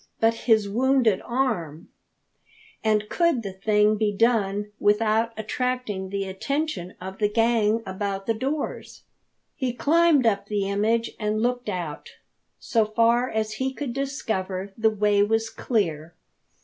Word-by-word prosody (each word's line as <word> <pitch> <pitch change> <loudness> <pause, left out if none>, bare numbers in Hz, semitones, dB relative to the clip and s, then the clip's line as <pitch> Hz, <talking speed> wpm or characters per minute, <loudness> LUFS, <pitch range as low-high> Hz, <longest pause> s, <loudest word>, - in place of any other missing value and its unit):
But 225 0 +4
his 220 -2 +2
wounded 240 -1 +2
arm! 200 - -2 0.9
And 215 -1 +1
could 335 -7 +1
the 195 -2 -5
thing 210 +2 +2
be 210 -1 +1
done 205 -2 +1
without 220 +2 +2
attracting 220 -3 -2
the 200 0 -2
attention 195 - -3
of 190 +1 -8
the 210 -1 +2
gang 225 0 +2
about 195 0 -4
the 225 - +1
doors? 275 +6 -4 0.5
He 255 -3 -2
climbed 310 +1 +3
up 200 -3 +1
the 205 -2 -1
image 220 +4 0
and 215 0 -1
looked 245 -2 -1
out. 175 -6 -5 0.4
So 225 -2 +1
far 230 +3 +2
as 215 -1 -2
he 265 0 0
could 275 -5 -4
discover 200 -8 -3
the 220 0 +3
way 210 -1 +2
was 225 +2 +1
clear. 165 - -2
215 Hz, 135 wpm, -25 LUFS, 200-240 Hz, 0.9 s, But